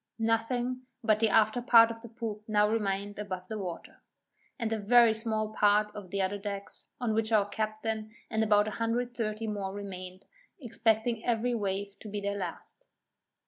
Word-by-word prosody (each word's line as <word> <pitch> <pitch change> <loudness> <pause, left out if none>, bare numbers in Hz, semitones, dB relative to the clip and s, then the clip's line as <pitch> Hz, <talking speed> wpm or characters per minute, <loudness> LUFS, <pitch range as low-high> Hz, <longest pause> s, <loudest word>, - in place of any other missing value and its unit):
Nothing 240 +3 -1 0.2
but 215 -1 +3
the 225 -1 +3
after 220 +3 +3
part 230 -2 +7
of 225 0 -9
the 235 - -10
poop 215 -2 -6
now 210 -1 +3
remained 205 -2 -1
above 185 -3 -5
water, 190 -6 -6 0.6
and 225 -1 -1
a 220 - -1
very 230 +2 +6
small 220 -1 -1
part 210 0 +3
of 205 -3 -8
the 195 +1 0
other 200 +2 -2
decks, 200 0 -6
on 240 -3 0
which 220 +1 +1
our 210 -2 +4
captain, 215 +1 -3 0.2
and 220 0 0
about 210 -1 +4
130 230 0 -2
more 205 -3 -3
remained, 185 -2 -8 0.3
expecting 225 -2 0
every 240 +1 +1
wave 200 -2 -3
to 215 - -9
be 205 0 -3
their 200 0 -2
last. - - -7
215 Hz, 165 wpm, -30 LUFS, 205-225 Hz, 0.6 s, part